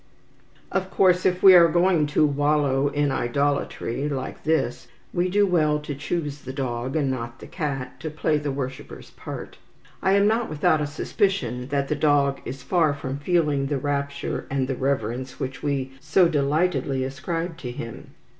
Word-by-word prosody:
Of 190 Hz, -1 st, -1 dB
course, 185 Hz, -2 st, +3 dB
if 180 Hz, 0 st, -1 dB
we 190 Hz, -1 st, +10 dB
are 170 Hz, -2 st, +8 dB
going 175 Hz, -2 st, +3 dB
to 150 Hz, +1 st, +3 dB
wallow 145 Hz, -1 st, +2 dB
in 145 Hz, 0 st, 0 dB
idolatry 140 Hz, +1 st, -1 dB
like 135 Hz, -1 st, -5 dB
this, 160 Hz, +1 st, 0 dB, 0.3 s
we 180 Hz, 0 st, +1 dB
do 205 Hz, +2 st, +3 dB
well 155 Hz, -5 st, +2 dB
to 150 Hz, -1 st, -5 dB
choose 150 Hz, 0 st, -3 dB
the 130 Hz, -, -7 dB
dog, 130 Hz, -1 st, -3 dB
and 140 Hz, -4 st, +1 dB
not 120 Hz, -1 st, -5 dB
the -, -, -11 dB
cat, 135 Hz, -5 st, -4 dB
to 160 Hz, -, -4 dB
play 155 Hz, 0 st, 0 dB
the 145 Hz, 0 st, -3 dB
worshipper's 135 Hz, -1 st, -6 dB
part. -, -, -8 dB, 0.4 s
I 190 Hz, -, +3 dB
am 200 Hz, 0 st, +4 dB
not 225 Hz, +2 st, +1 dB
without 155 Hz, 0 st, +2 dB
a 150 Hz, -, -1 dB
suspicion 145 Hz, -, -1 dB
that 140 Hz, 0 st, -1 dB
the 150 Hz, -, 0 dB
dog 145 Hz, -2 st, +2 dB
is 130 Hz, 0 st, -6 dB
far 160 Hz, -2 st, +2 dB
from 140 Hz, -1 st, -5 dB
feeling 150 Hz, -4 st, +1 dB
the 145 Hz, 0 st, -1 dB
rapture 140 Hz, 0 st, -3 dB
and 135 Hz, -1 st, 0 dB
the 135 Hz, -, -2 dB
reverence 130 Hz, -1 st, -2 dB
which 130 Hz, +1 st, -4 dB
we 140 Hz, -3 st, -1 dB
so 180 Hz, +5 st, +4 dB
delightedly 145 Hz, -2 st, +1 dB
ascribe 165 Hz, +6 st, -3 dB
to 125 Hz, -, -5 dB
him. 115 Hz, -2 st, -8 dB
145 Hz, 175 wpm, -24 LUFS, 135-165 Hz, 0.4 s, we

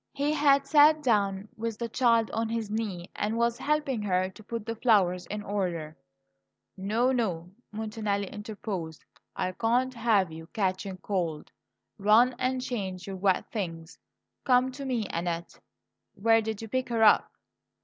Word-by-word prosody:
He 285 Hz, +2 st, 0 dB
had 280 Hz, -2 st, +4 dB
sat 300 Hz, +1 st, +5 dB
down 200 Hz, -5 st, +1 dB
with 225 Hz, -1 st, -4 dB
the 235 Hz, -, -3 dB
child 230 Hz, -1 st, +2 dB
on 225 Hz, 0 st, -1 dB
his 225 Hz, -2 st, -3 dB
knee, 205 Hz, -6 st, -3 dB
and 215 Hz, +2 st, -1 dB
was 235 Hz, 0 st, +1 dB
helping 295 Hz, -5 st, 0 dB
her 185 Hz, -2 st, 0 dB
to 215 Hz, -, -15 dB
put 230 Hz, 0 st, -5 dB
the 230 Hz, -, -3 dB
flowers 190 Hz, -7 st, +2 dB
in 210 Hz, +1 st, -5 dB
order. 175 Hz, -7 st, -3 dB, 0.8 s
"No, 220 Hz, +6 st, +1 dB
no!" 180 Hz, -9 st, -1 dB, 0.2 s
Montanelli 210 Hz, -2 st, -2 dB
interposed. 205 Hz, -7 st, -6 dB, 0.3 s
"I 185 Hz, -, -1 dB
can't 245 Hz, +6 st, +1 dB
have 220 Hz, -7 st, +2 dB
you 160 Hz, 0 st, -9 dB
catching 190 Hz, -1 st, -1 dB
cold. 175 Hz, -5 st, -3 dB, 0.5 s
Run 220 Hz, +5 st, +5 dB
and 255 Hz, 0 st, 0 dB
change 195 Hz, -8 st, -4 dB
your 195 Hz, -1 st, -6 dB
wet 190 Hz, -1 st, +2 dB
things. 165 Hz, -6 st, -5 dB, 0.4 s
Come 255 Hz, 0 st, +3 dB
to 275 Hz, +1 st, -7 dB
me, 245 Hz, -5 st, -1 dB
Annette. 170 Hz, 0 st, -3 dB, 0.6 s
Where 225 Hz, +2 st, +4 dB
did 220 Hz, 0 st, -4 dB
you -, -, -6 dB
pick 255 Hz, +3 st, -2 dB
her 230 Hz, -2 st, +1 dB
up?" 210 Hz, -, +5 dB
215 Hz, 155 wpm, -28 LUFS, 190-235 Hz, 0.8 s, sat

